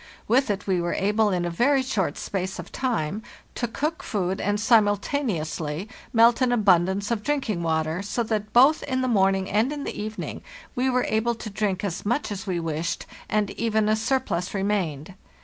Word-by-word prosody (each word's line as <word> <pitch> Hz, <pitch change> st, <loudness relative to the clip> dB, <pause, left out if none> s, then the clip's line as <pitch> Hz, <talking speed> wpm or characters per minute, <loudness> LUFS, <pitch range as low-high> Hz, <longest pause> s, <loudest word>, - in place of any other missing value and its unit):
With 260 Hz, +3 st, +3 dB
it 205 Hz, 0 st, -2 dB
we 185 Hz, -3 st, +1 dB
were 170 Hz, 0 st, -1 dB
able, 210 Hz, +2 st, +2 dB
in 180 Hz, -3 st, 0 dB
a 175 Hz, -, -2 dB
very 265 Hz, +9 st, +3 dB
short 195 Hz, -, -1 dB
space 190 Hz, -1 st, -3 dB
of -, -, -8 dB
time, 215 Hz, -7 st, -1 dB, 0.3 s
to 240 Hz, -, -2 dB
cook 305 Hz, +8 st, -2 dB
food 190 Hz, -2 st, -2 dB
and 205 Hz, +1 st, 0 dB
simultaneously 205 Hz, -, +1 dB, 0.2 s
melt 230 Hz, +2 st, +5 dB
an 255 Hz, -1 st, +3 dB
abundance 200 Hz, -2 st, +3 dB
of 230 Hz, -3 st, 0 dB
drink 280 Hz, -2 st, -1 dB
ing 175 Hz, -4 st, -2 dB
water, 160 Hz, +1 st, 0 dB
so 215 Hz, +4 st, -2 dB
that 215 Hz, -1 st, -2 dB
both 270 Hz, +7 st, +6 dB
in 260 Hz, -2 st, -1 dB
the 255 Hz, -, 0 dB
morning 195 Hz, -4 st, +2 dB
and 220 Hz, +7 st, +1 dB
in 290 Hz, -1 st, -4 dB
the -, -, -4 dB
evening 215 Hz, +1 st, -5 dB, 0.3 s
we 260 Hz, 0 st, +1 dB
were 250 Hz, -1 st, +1 dB
able 225 Hz, +2 st, +1 dB
to 220 Hz, -1 st, -7 dB
drink 200 Hz, -2 st, -1 dB
as 190 Hz, -4 st, -3 dB
much 240 Hz, +3 st, -1 dB
as 200 Hz, 0 st, -5 dB
we 180 Hz, -2 st, -1 dB
wished, 165 Hz, +1 st, -3 dB, 0.2 s
and 210 Hz, -2 st, +1 dB
even 220 Hz, -1 st, 0 dB
a 215 Hz, -, +3 dB
surplus 220 Hz, -6 st, -1 dB
remained. 190 Hz, -5 st, -1 dB
210 Hz, 190 wpm, -25 LUFS, 185-235 Hz, 0.3 s, both